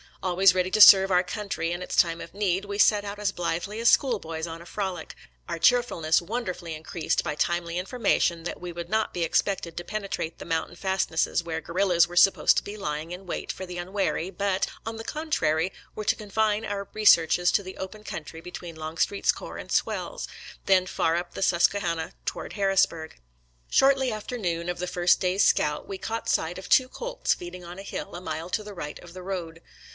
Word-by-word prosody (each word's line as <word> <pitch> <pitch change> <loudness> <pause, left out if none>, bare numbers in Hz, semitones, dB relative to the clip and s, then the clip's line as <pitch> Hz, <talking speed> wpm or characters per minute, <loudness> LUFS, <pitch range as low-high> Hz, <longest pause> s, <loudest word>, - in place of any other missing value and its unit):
Always 185 0 +5
ready 185 0 +1
to 215 - +3
serve 195 -1 +10
our 180 0 +4
country 200 -4 -3
in 175 +1 -3
its 180 - -4
time 165 -1 +3
of 165 - -9
need, 195 -1 0
we 200 0 -5
set 205 0 +5
out 200 0 -5
as 205 -1 0
blithely 175 +4 -3
as 235 - +5
schoolboys 165 - +1
on 165 0 -7
a - - -12
frolic, 190 -5 -4 0.3
our - - -2
cheerfulness 175 -7 +3
wonderfully 180 -4 -4
increased 160 +2 -2
by 155 - -2
timely 170 +2 -1
information 180 -4 +1
that 175 - -5
we 180 -1 -5
would 170 0 -7
not 220 +1 0
be 175 - -1
expected 170 0 0
to 175 - -3
penetrate 195 -4 -4
the - - -9
mountain 165 +1 -2
fastnesses 185 -3 0
where 165 -1 -4
guerrillas 175 -1 +2
were 175 - -10
supposed 195 +2 +5
to - - +1
be 205 +1 -7
lying 155 -3 -4
in 180 +2 -7
wait - - -3
for 190 - -7
the 180 -1 -7
unwary, 185 -1 -1
but, 195 +1 0 0.2
on 225 0 -4
the 225 - -6
contrary, 190 - 0 0.2
were 215 - -5
to - - +3
confine 215 +1 0
our 200 -1 -4
researches 175 -4 +5
to 200 - +2
the 185 0 -9
open 210 +3 -7
country 165 -3 -7
between 175 -1 -8
Longstreet's 160 +5 0
corps - - -8
and - - -9
Swell's, - - -1 0.4
then 185 -1 +4
far 165 -2 +1
up 175 0 -3
the - - -3
Susquehanna 170 -2 +1
toward - - -4
Harrisburg. 195 -5 +1 0.5
Shortly 270 -2 +4
after 215 +3 -5
noon 170 -5 -2
of 180 - -2
the 180 - -2
first 175 0 +3
day's 185 +1 +2
scout 150 0 +1
we 195 - -5
caught 225 +1 -4
sight 165 +2 0
of 190 - -9
two 255 -1 +5
colts - - -1
feeding 180 +1 -9
on 175 +1 -9
a - - -7
hill - - -6
a 175 - -6
mile 165 -1 -5
to 215 - -1
the 210 0 -9
right 150 -5 -6
of 175 -1 -13
the 185 0 -9
road. 170 -4 -5
180 Hz, 205 wpm, -26 LUFS, 170-205 Hz, 0.5 s, serve